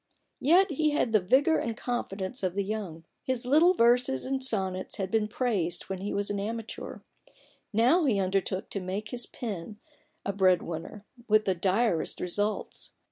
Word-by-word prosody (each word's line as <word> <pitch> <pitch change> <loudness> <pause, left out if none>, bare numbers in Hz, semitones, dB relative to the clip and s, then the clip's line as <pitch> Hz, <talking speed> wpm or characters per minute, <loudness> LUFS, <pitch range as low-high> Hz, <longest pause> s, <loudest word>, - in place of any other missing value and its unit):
Yet 350 +6 +4
he 305 +1 +2
had 275 -6 0
the 215 - +6
vigour 270 - +3
and 230 -1 -3
confidence 225 -3 -3
of 185 -2 -1
the 200 - 0
young. 195 -6 -5 0.2
His 255 -1 -1
little 320 +8 +5
verses 240 - +3
and 265 0 -2
sonnets 190 -6 -1
had 190 -2 -3
been 220 -2 +2
praised 200 -8 -1
when 190 -1 -3
he 200 +2 -4
was 200 0 -1
an 200 - -2
amateur; 225 +2 -5 0.7
now 250 - +4
he 220 -8 +2
undertook 190 0 -1
to 200 - -2
make 195 +3 -4
his 245 -1 -4
pen 210 -3 -6 0.5
a 200 - -1
bread 190 -2 +5
8 - - +3
A - - -9
BOOK - - -15
OF - - -9
BARGAINS. - - -6
winner 175 +5 -7
— 240 -1 -21
with 215 0 +4
the 190 - +2
direst 190 +1 0
results. 205 +4 -3
210 Hz, 195 wpm, -28 LUFS, 190-245 Hz, 0.7 s, the